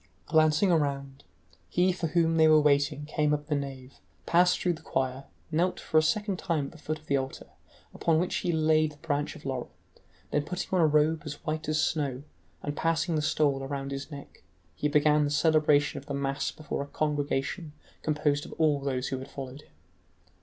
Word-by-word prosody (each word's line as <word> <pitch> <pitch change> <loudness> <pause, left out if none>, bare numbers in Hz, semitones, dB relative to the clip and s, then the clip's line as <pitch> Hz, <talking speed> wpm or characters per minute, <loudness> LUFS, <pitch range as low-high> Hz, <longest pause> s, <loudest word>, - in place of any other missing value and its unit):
Glancing 155 +4 +3
around, 140 -4 -1 0.5
he 180 +1 +3
for 175 -2 -2
whom 165 0 +2
they 160 0 +6
were 155 0 +7
waiting 145 0 +2
came 150 0 +1
up 145 0 -7
the 150 -1 -1
nave, 135 -2 -6 0.3
passed 180 +1 +4
through 180 - +1
the 160 - -10
choir, 130 -2 -2 0.3
knelt 175 +4 +1
for 155 - +2
a - - +4
second 200 +3 0
time 165 -6 -1
at - - -8
the 165 - -14
foot 155 +1 -3
of 155 - -21
the 140 - +1
altar, 135 0 -5 0.5
upon 165 -2 +2
which 180 - 0
he 175 - -1
laid 155 -1 +2
the - - -19
branch 145 -2 -2
of - - -13
laurel, 130 -2 -3 0.6
then 150 - +1
putting 180 +4 -4
on 185 - +4
a 160 - +5
robe 155 +1 +3
as 150 +1 -8
white 155 -1 -2
as 155 0 +1
snow 140 -5 -1 0.4
and 145 0 -3
passing 165 +1 0
the 155 - +1
stole 145 -2 +1
around 135 0 -4
his 135 +2 -5
neck, 140 -2 -11 0.3
he 150 - -1
began 150 0 +4
the 145 - 0
celebration 150 -2 +3
of 140 - -17
the 140 - -3
mass 140 0 -1
before 155 -2 -5
a 140 - -5
congregation 145 +2 -2 0.3
composed 150 -1 0
of - - -9
all 150 -3 +2
those 135 -2 -2
who 130 - -3
had 135 +1 -9
followed 135 0 -8
him. - - -25
150 Hz, 205 wpm, -28 LUFS, 140-160 Hz, 0.6 s, were